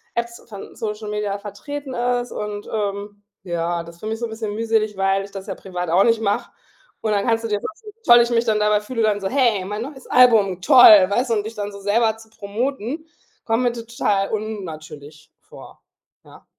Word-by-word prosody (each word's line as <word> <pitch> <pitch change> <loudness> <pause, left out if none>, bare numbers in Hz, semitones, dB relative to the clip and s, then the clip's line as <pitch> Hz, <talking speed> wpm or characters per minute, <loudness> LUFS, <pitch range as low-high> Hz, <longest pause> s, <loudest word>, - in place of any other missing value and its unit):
Apps 235 0 -4
von 200 -2 -10
Social 210 -1 -5
Media 210 -1 -2
vertreten 260 +7 -7
ist. 245 0 -1
Und, 210 -1 -5
ähm, 205 -1 -4 0.2
ja, 170 -1 -2
das 170 0 -13
finde 215 +1 -4
ich - - -11
so 235 - -2
'n - - -6
bisschen 220 -2 -5
mühselig, 220 -2 0
weil 195 0 +1
ich 200 - -14
das 195 +1 -8
ja - - -4
privat 180 -3 -5
auch 180 +4 +4
nicht 230 -1 +2
mache. 205 -1 -1 0.5
Und 220 - -1
dann 200 -1 +1
kannst 225 0 +1
du - - -2
dir 210 -1 -1
vorstellen, 425 +5 -8
wie 455 - -14
toll 240 0 +9
ich 235 - +1
mich 235 0 +2
dann 215 -1 +1
dabei 210 0 +2
fühle, 230 +1 -2
dann 205 -2 +1
so: 190 - -1
„Hey, 235 -8 +2
mein 210 +3 -4
neues 270 -1 -10
Album, 220 -7 +5
toll“, 215 -8 +8
weißt 245 +4 0
du? 230 - +2
Und 210 0 -1
dich 225 +1 -7
dann 205 0 -4
so 200 - -10
selber 220 +2 +1
zu 220 0 -16
promoten, 250 +8 -4 0.4
kommt 225 +2 +1
mir 240 -1 +1
total 225 -4 -1
unnatürlich 155 -8 -7
vor, - - -14 0.4
ja. - - -17
215 Hz, 215 wpm, -21 LUFS, 200-235 Hz, 0.5 s, toll